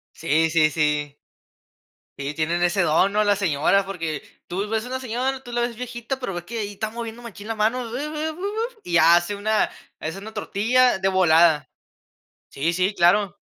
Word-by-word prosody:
Sí, 160 Hz, 0 st, +1 dB
sí, 155 Hz, -1 st, +4 dB
sí. 150 Hz, -1 st, 0 dB, 1.0 s
Sí, 140 Hz, +1 st, -3 dB
tienen 165 Hz, +3 st, 0 dB
ese 185 Hz, +3 st, +2 dB
don, 175 Hz, +4 st, +3 dB
¿no? 210 Hz, +1 st, +3 dB
Las 205 Hz, -1 st, +2 dB
señoras, 190 Hz, +1 st, +2 dB
porque 165 Hz, -6 st, -4 dB, 0.2 s
tú 195 Hz, +4 st, -3 dB
ves 220 Hz, +1 st, -1 dB
una 260 Hz, +1 st, -4 dB
señora, 260 Hz, +2 st, -2 dB
tú 245 Hz, -, -10 dB
la 240 Hz, 0 st, 0 dB
ves 240 Hz, 0 st, -2 dB
viejita, 245 Hz, +2 st, -5 dB
pero 250 Hz, -7 st, -4 dB
ves 175 Hz, 0 st, -6 dB
que 230 Hz, +5 st, -6 dB
ahí 205 Hz, -2 st, -3 dB
está 215 Hz, +2 st, -3 dB
moviendo 230 Hz, +1 st, -7 dB
machín 210 Hz, -3 st, -10 dB
la 225 Hz, -, -1 dB
mano, 225 Hz, +2 st, 0 dB
bebe 300 Hz, +5 st, -3 dB
bu, 325 Hz, +3 st, -11 dB
buf. 445 Hz, +5 st, -3 dB
Y 175 Hz, -, +1 dB
hace 175 Hz, +4 st, +5 dB
una 215 Hz, +1 st, +1 dB, 0.3 s
es 160 Hz, +3 st, -4 dB
una 210 Hz, +3 st, -9 dB
tortilla 245 Hz, +5 st, +2 dB
de 190 Hz, -, 0 dB
volada. 170 Hz, -4 st, +4 dB, 0.8 s
Sí, 155 Hz, +5 st, -1 dB
sí, 185 Hz, +4 st, 0 dB
claro. 190 Hz, +2 st, +3 dB
200 Hz, 185 wpm, -23 LUFS, 170-235 Hz, 1.0 s, hace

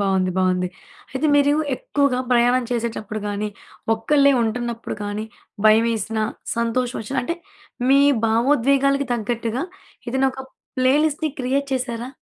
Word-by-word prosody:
బాగుంది. 190 Hz, -2 st, +1 dB
బాగుంది. 185 Hz, -1 st, +1 dB, 0.4 s
అయితే 270 Hz, +4 st, 0 dB
మీరు 285 Hz, 0 st, +4 dB, 0.2 s
ఎక్కువగా 280 Hz, -1 st, 0 dB
ప్రయాణం 245 Hz, +1 st, +3 dB
చేసేటప్పుడు 225 Hz, -3 st, -3 dB
గాని, 205 Hz, +1 st, -2 dB, 0.5 s
ఒక్కళ్ళే 280 Hz, +5 st, +3 dB
ఉంటున్నప్పుడు 235 Hz, 0 st, -3 dB
కానీ, 205 Hz, +1 st, -3 dB, 0.4 s
భయవేసిన, 225 Hz, 0 st, +3 dB, 0.4 s
సంతోషం 240 Hz, +2 st, 0 dB
వచ్చిన 265 Hz, +5 st, -5 dB
అంటే, 335 Hz, +7 st, -3 dB, 0.5 s
మీ 275 Hz, +1 st, +6 dB, 0.3 s
భావోద్వేగాలకు 275 Hz, +4 st, +2 dB
తగ్గట్టుగా 235 Hz, +3 st, -2 dB, 0.5 s
ఏదైనా 265 Hz, +2 st, +2 dB
ఒక 265 Hz, -, -8 dB, 0.3 s
ప్లేలిస్ట్‌ని 295 Hz, +4 st, +2 dB
క్రియేట్ 275 Hz, +2 st, 0 dB
చేసారా? 245 Hz, -2 st, -2 dB
240 Hz, 115 wpm, -22 LUFS, 220-275 Hz, 0.5 s, మీ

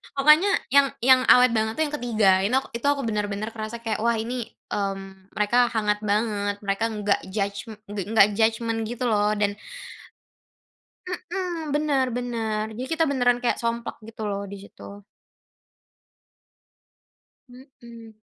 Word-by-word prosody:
Pokoknya 305 Hz, +8 st, +5 dB, 0.3 s
yang 280 Hz, -1 st, +7 dB
yang 255 Hz, +1 st, +5 dB
awet 250 Hz, -1 st, +6 dB
banget 220 Hz, 0 st, 0 dB
tuh 315 Hz, -, +4 dB
yang 295 Hz, -, -4 dB
ke-3, 225 Hz, -7 st, 0 dB, 0.2 s
ini 200 Hz, -, 0 dB
ak 270 Hz, -, -11 dB
itu 235 Hz, -, -6 dB
aku 280 Hz, -, -1 dB
benar-benar 210 Hz, -1 st, -2 dB
kerasa 220 Hz, +1 st, -5 dB
kayak, 220 Hz, -2 st, -2 dB
Wah 235 Hz, 0 st, +2 dB
ini, 235 Hz, +3 st, -4 dB, 0.4 s
mmm, 195 Hz, -1 st, -5 dB
mereka 210 Hz, +3 st, +1 dB, 0.2 s
hangat 210 Hz, -2 st, 0 dB
banget, 205 Hz, -1 st, 0 dB
mereka 195 Hz, +2 st, -1 dB
enggak 205 Hz, -1 st, 0 dB
judgm 200 Hz, +1 st, -3 dB, 0.2 s
engga 205 Hz, 0 st, -4 dB
enggak 215 Hz, -2 st, +6 dB
judgement 225 Hz, 0 st, +1 dB
gitu 245 Hz, +1 st, -5 dB
loh 210 Hz, 0 st, +2 dB
dan 205 Hz, -1 st, +2 dB, 1.8 s
mmm, 350 Hz, -5 st, -3 dB
benar, 290 Hz, -3 st, +1 dB
benar. 225 Hz, -3 st, -2 dB
Jadi 255 Hz, +3 st, -5 dB
kita 325 Hz, 0 st, +2 dB
beneran 245 Hz, -2 st, +2 dB
kayak 240 Hz, -, +2 dB
somplak 235 Hz, 0 st, -2 dB
gitu 225 Hz, 0 st, -10 dB
loh, 200 Hz, 0 st, -3 dB
di 200 Hz, -, -7 dB
situ. -, -, -15 dB, 2.7 s
Mmm. 235 Hz, -3 st, -14 dB
225 Hz, 140 wpm, -24 LUFS, 210-250 Hz, 2.7 s, yang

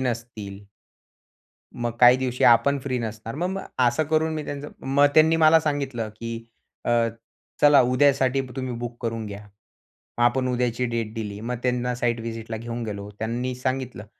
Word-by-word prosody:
नसतील 115 Hz, -5 st, -4 dB, 1.1 s
मग 120 Hz, -1 st, -2 dB
काही 125 Hz, 0 st, +8 dB
दिवशी 130 Hz, -1 st, -1 dB
आपण 140 Hz, +4 st, +5 dB
फ्री 130 Hz, -2 st, -2 dB
नसणार. 110 Hz, 0 st, -5 dB
म 175 Hz, +4 st, -1 dB
मग 190 Hz, +1 st, -3 dB, 0.3 s
असं 120 Hz, +6 st, +1 dB
करून, 160 Hz, 0 st, +2 dB
मी 155 Hz, -, -4 dB
त्यांचं 145 Hz, 0 st, -6 dB, 0.2 s
मग 140 Hz, +2 st, +4 dB
त्यांनी 160 Hz, +1 st, +6 dB
मला 160 Hz, 0 st, +6 dB
सांगितलं, 135 Hz, -7 st, -2 dB
की 115 Hz, 0 st, -6 dB, 0.4 s
अ, -, -, 0 dB, 0.7 s
"चला, 145 Hz, -1 st, +7 dB
उद्यासाठी 135 Hz, +1 st, +3 dB, 0.2 s
तुम्ही 130 Hz, -1 st, -3 dB
बुक 120 Hz, 0 st, -6 dB
करून 115 Hz, -1 st, -3 dB
घ्या." 100 Hz, 0 st, -8 dB, 0.8 s
मग, 120 Hz, -, +3 dB
आपण 130 Hz, +1 st, +2 dB
उद्याची 125 Hz, -1 st, 0 dB
डेट 115 Hz, -2 st, -3 dB
दिली. 105 Hz, -2 st, -5 dB
मग 125 Hz, +2 st, -3 dB
त्यांना 125 Hz, 0 st, 0 dB
साइट 120 Hz, -1 st, -1 dB
व्हिजिटला 115 Hz, 0 st, -5 dB
घेऊन 120 Hz, +1 st, -5 dB
गेलो. 100 Hz, -1 st, -6 dB
त्यांनी 120 Hz, +3 st, -2 dB
सांगितलं 130 Hz, -3 st, -3 dB
125 Hz, 160 wpm, -24 LUFS, 115-135 Hz, 1.1 s, काही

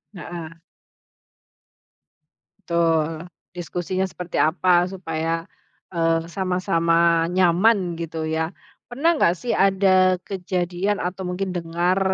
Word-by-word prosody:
Heeh. 165 Hz, -1 st, -7 dB, 2.1 s
Betul, 165 Hz, -1 st, +1 dB, 0.2 s
diskusinya 180 Hz, +2 st, -3 dB
seperti 180 Hz, -1 st, -5 dB
apa 175 Hz, +2 st, +3 dB
supaya, 165 Hz, -3 st, -3 dB, 0.5 s
eee, 165 Hz, -1 st, +1 dB
sama-sama 170 Hz, -3 st, +2 dB
nyaman 180 Hz, 0 st, +2 dB
gitu 165 Hz, -1 st, -4 dB
ya. 160 Hz, +1 st, -2 dB, 0.3 s
Pernah 300 Hz, +6 st, +1 dB
nggak 170 Hz, -, +4 dB
sih 240 Hz, +5 st, -4 dB
ada 190 Hz, -1 st, +4 dB
kejadian 185 Hz, +1 st, -2 dB
atau 180 Hz, +1 st, -4 dB
mungkin 185 Hz, +1 st, -3 dB
dengar, 175 Hz, +2 st, 0 dB
175 Hz, 95 wpm, -22 LUFS, 165-185 Hz, 2.1 s, nggak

